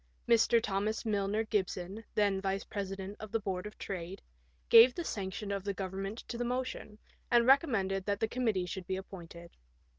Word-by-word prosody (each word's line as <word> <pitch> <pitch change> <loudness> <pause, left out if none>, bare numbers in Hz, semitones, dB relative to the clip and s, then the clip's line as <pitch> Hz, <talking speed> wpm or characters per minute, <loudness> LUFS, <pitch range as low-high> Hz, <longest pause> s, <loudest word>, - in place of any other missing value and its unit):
Mr. 235 0 +5
Thomas 215 +1 -1
Milner 205 0 0
Gibson, 195 -1 -2
then 200 -2 +2
Vice 195 0 -1
President 195 0 -5
of 215 -2 -8
the 225 - +1
Board 190 -1 -3
of 210 - -12
Trade, 185 0 -6 0.4
gave 235 +2 +8
the 345 - -3
sanction 200 - -4
of 200 -1 -2
the 200 -1 -2
Govern 190 0 -4
ment 195 +3 -4
to 235 - -5
the - - 0
motion, 250 -3 -3 0.3
and 235 -1 +5
recommended 220 - +3
that 200 0 0
the 225 - +1
committee 220 -6 0
should 185 0 -6
be 190 - -1
appointed. 170 -3 -9
200 Hz, 180 wpm, -32 LUFS, 190-225 Hz, 0.4 s, gave